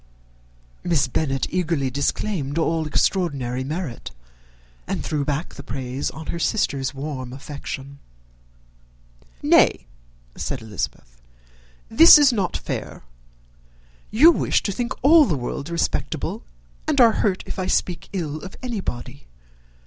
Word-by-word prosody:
Miss 165 -6 +2
Bennet 135 0 -1
eagerly 165 -7 0
disclaimed 140 +2 -2
all 160 -1 0
extraordinary 140 -7 0
merit, 150 - -5 0.8
and - - -3
threw 150 -2 -1
back 150 +3 -3
the - - -9
praise 130 0 -4
on 160 - -9
her 170 - -4
sister's 140 -9 0
warm 135 -3 -6
affection. 140 0 -7 1.4
"Nay," - - +4 0.5
said 135 - -3
Elizabeth, 80 - -6 0.7
"this 325 +10 +9
is 285 -4 +5
not 195 -6 -1
fair. - - -6 1.1
You 295 +11 +7
wish - - +1
to 200 - -1
think 235 +4 -2
all 310 +2 +7
the 160 - 0
world 140 +4 -5
respectable, 170 0 -2 0.5
and 300 -3 +1
are 235 -2 +7
hurt 190 -3 0
if - - -6
I 185 - -1
speak 180 -2 -1
ill 160 -6 -3
of 190 - -10
anybody. 145 - -5
155 Hz, 125 wpm, -23 LUFS, 135-190 Hz, 1.4 s, this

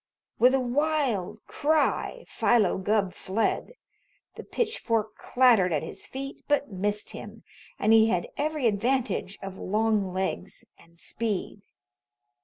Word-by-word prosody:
With 255 +2 +6
a - - +2
wild 250 - -1
cry, 315 - 0
Philo 220 -6 +2
Gubb 195 -1 +1
fled. 220 - -1 0.6
The - - -9
pitchfork 230 - -1
clattered 240 -8 +3
at 150 -3 0
his - - -7
feet, 275 +1 -7
but 285 -4 +1
missed 205 +2 -2
him, - - -10 0.3
and 215 +2 +3
he 220 0 +7
had 180 -6 0
every 300 -2 -1
advantage 230 -2 0
of 195 -1 -7
long 210 -1 +1
legs 190 +1 -3
and 170 0 -22
speed. 210 -2 -3
220 Hz, 125 wpm, -27 LUFS, 195-265 Hz, 0.6 s, he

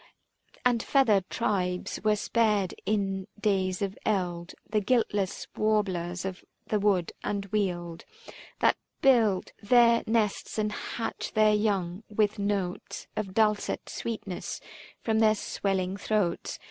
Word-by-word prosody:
And 240 -2 +3
feathered 220 -10 +3
tribes 180 -5 -1
were 215 -1 +4
spared 210 -3 +1
in 195 -2 0
days 190 -3 +1
of 195 0 -4
eld, 180 -4 -1
The 210 0 +1
guiltless 205 -3 0
warblers 190 -5 0
of 190 -1 -5 0.2
the 210 - 0
wood 195 -4 +2
and 200 -1 -2
weald 175 -5 -2 0.6
That - - +4 0.3
build 225 -8 +4
their 235 +1 +5
nests 220 -2 0
and 210 -1 0
hatch 225 +2 -4
their 215 0 +5
young 200 -3 0
with 210 0 +1
notes 200 -3 -2
Of 195 -3 -4
dulcet 215 -2 +1
sweetness 215 -5 -4 0.4
from 220 -1 +2
their 215 -1 +5
swelling 195 -2 -1
throats. 205 -5 -1
205 Hz, 120 wpm, -28 LUFS, 185-215 Hz, 0.6 s, their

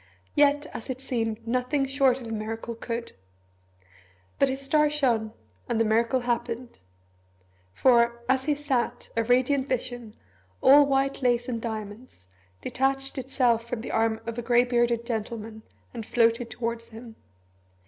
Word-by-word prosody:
Yet, 290 0 +3
as 225 - -8
it 260 0 -3
seemed, 230 -4 -3
nothing 255 +4 0
short 270 -1 +2
of 245 - -9
a 225 - -6
miracle 225 +2 -4
could. 230 +1 -5 1.3
But 275 - +4
his 265 +1 -2
star 300 +2 +2
shone, 240 -7 +1 0.4
and 225 - 0
the 225 - +3
miracle 230 +4 +2
happened. 240 0 -3 0.9
For, 235 - +3
as 260 0 +1
he 300 -1 +2
sat, 260 -4 -2
a 230 - +2
radiant 260 +3 +2
vision, 245 -3 -3 0.4
all 285 +1 +7
white 275 0 0
lace 245 -1 +1
and 235 -3 -3
diamonds, 215 - -7 0.4
detached 270 - -1
itself 245 -3 +1
from 240 -2 -3
the - - -6
arm 225 0 +1
of 230 0 -4
a - - -2
grey 240 0 +4
bearded 240 -1 +1
gentleman, 220 -1 -5 0.3
and 230 -2 -5
floated 230 +1 +2
towards 230 0 -4
him. 225 0 -12
240 Hz, 150 wpm, -26 LUFS, 230-265 Hz, 1.3 s, all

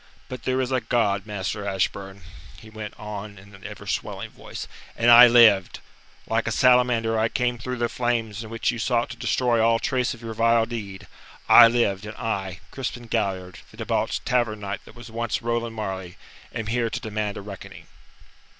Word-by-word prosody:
But 130 -1 -8
there 130 0 0
is 130 0 -1
a 130 -1 +1
God, 110 -4 0
Master 105 0 -4
Ashburn," 95 0 -3 0.4
he 110 - -14
went 110 -1 -8
on 105 -1 -7
in 100 +2 -16
an 100 -1 -15
ever - - -9
swelling - - -4
voice, - - -9 0.3
"and 120 +1 +4
I 120 +1 +11
lived. 115 -6 +5 0.5
Like - - -1
a - - 0
salamander 125 -3 +3
I 110 +1 +2
came 120 0 -1
through 125 +2 -4
the 120 0 0
flames 115 -3 -2
in 110 - -10
which 115 0 -1
you 120 - -6
sought 120 +1 0
to - - -7
destroy 120 -3 +1
all 115 0 +4
trace 125 0 -1
of 115 - -16
your 115 -1 -5
vile 115 0 +3
deed. 105 -5 -7 0.4
I 120 - +10
lived, 105 -4 0
and 105 - -9
I, 95 -5 -3
Crispin 125 -2 -5
Galliard, 95 -3 -2
the - - -17
debauched - - -2
Tavern 120 -4 0
Knight 100 0 -5
that - - -15
was 120 -1 -11
once 115 0 -3
Roland 115 -1 -2
Marleigh, 95 -4 -5 0.4
am 115 -2 -4
here 115 +1 0
to - - -4
demand 105 -1 -3
a - - -6
reckoning." 100 -2 -10
115 Hz, 190 wpm, -24 LUFS, 100-120 Hz, 0.5 s, I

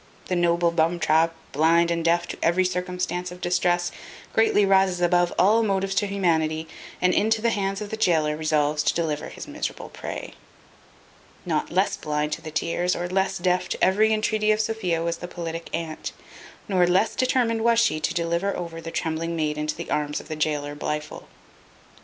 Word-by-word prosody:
The 185 - +1
noble 170 0 +2
bumtrap, 165 0 +2 0.2
blind 165 +3 +3
and 170 -1 -1
deaf 170 +1 +2
to - - -5
every 180 +3 +3
circumstance 180 0 -2
of 180 - -10
distress, 175 0 +1 0.4
greatly 220 -2 +4
rises 190 -2 +3
above 175 0 +3
all 215 +4 +5
the 220 - 0
motives 195 -1 0
to 205 - +2
humanity, 160 -5 0 0.3
and 180 0 +3
into 220 +2 +2
the 230 +1 +1
hands 195 -1 -1
of 210 - -6
the 220 - -3
gaoler 155 -7 +2
resolves 150 -1 +1
to - - +1
deliver 160 -3 -2
his - - -9
miserable - - -5
prey. - - -7 1.1
Not - - -1
less - - +1
blind 150 0 -2
to 160 - -3
the 160 - -7
tears, 170 +3 0
or 175 - -3
less 190 +1 0
deaf 180 0 0
to - - -3
every 215 +3 +4
entreaty 215 0 +1
of 215 - +2
Sophia 215 -7 -1
was 170 0 -1
the 175 - -7
politic 165 -1 -6
aunt, 160 -1 -4 0.5
nor 185 -3 +3
less 185 +5 +2
determined 240 -3 +1
was 235 0 +4
she 230 -9 +2
to - - -1
deliver 170 +4 0
over 165 -2 -6
the 165 - -6
trembling 165 +1 -2
maid 155 -2 -1
into 150 0 -2
the - - -7
arms 150 0 -1
of - - -13
the 155 - -3
gaoler 145 -1 -1
Blifil. 150 +1 -5
175 Hz, 185 wpm, -24 LUFS, 160-195 Hz, 1.1 s, all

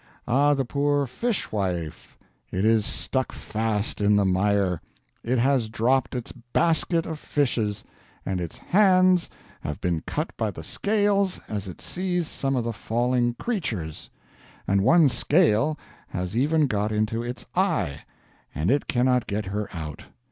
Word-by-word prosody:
Ah 145 +4 +4
the 135 -1 -1
poor 145 +2 +1
Fishwife, 105 - -3 0.3
it 95 +3 0
is 110 -2 +3
stuck 130 -1 -1
fast 110 -1 -2
in 105 0 +4
the 100 -1 +3
Mire; 95 -1 +1 0.4
it 125 +3 0
has 125 -2 +2
dropped 130 +4 +1
its 120 -2 -4
Basket 160 +7 +1
of 160 -2 -5
Fishes; 115 -10 -1 0.4
and 95 -2 -2
its 85 - -5
Hands 185 -2 +4 0.3
have 75 - -5
been 85 -3 -1
cut 155 +2 -3
by 110 -2 0
the 85 -5 -8
Scales 200 - +1
as 100 -2 -4
it 90 - -9
seized 180 -2 -2
some 135 -1 -1
of 125 - 0
the 115 0 -2
falling 120 +2 0
Creatures; 115 - -4 0.6
and 100 0 +3
one 165 - +6
Scale 150 - +3 0.3
has 90 +3 -4
even 150 +5 +3
got 105 -4 -1
into 110 +2 0
its 120 +1 -6
Eye, 70 +1 0 0.5
and 75 - +1
it 140 +1 +1
cannot 125 -1 +2
get 105 0 -2
her 105 +2 -3
out. 80 -4 -7
120 Hz, 150 wpm, -25 LUFS, 100-145 Hz, 0.6 s, one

